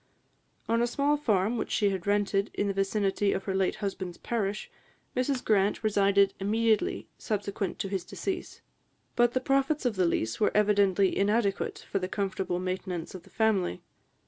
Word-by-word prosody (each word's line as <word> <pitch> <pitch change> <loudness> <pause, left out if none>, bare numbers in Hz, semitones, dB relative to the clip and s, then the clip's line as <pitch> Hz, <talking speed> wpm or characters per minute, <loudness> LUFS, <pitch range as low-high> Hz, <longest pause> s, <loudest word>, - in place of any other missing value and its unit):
On 230 +1 +2
a 240 - +2
small 280 +4 +1
farm 225 -5 +1
which - - -3
she 205 -2 +2
had 190 -1 -4
rented, 200 0 +1
in 205 - 0
the 200 - 0
vicinity 195 0 +1
of 195 - -3
her 195 - -2
late 190 -1 +1
husband's 190 -3 -4
parish, 210 -3 -2 0.5
Mrs 255 0 0
Grant 205 0 +2
resided 200 -2 +3
immediately 220 - +1
subsequent 205 -2 -3
to - - -3
his 190 -2 -2
decease; 370 - -5 0.5
but 240 0 +3
the 255 - +2
profits 275 +2 +1
of 230 -5 0
the 180 -2 +3
lease 110 -9 -1
were 210 - +4
evidently 200 -2 +3
inadequate 200 0 0
for 195 - -1
the 185 - -2
comfortable 190 -3 -2
maintenance 185 -2 -4
of 185 - -8
the - - -20
family. 200 - +1
200 Hz, 170 wpm, -28 LUFS, 190-225 Hz, 0.5 s, were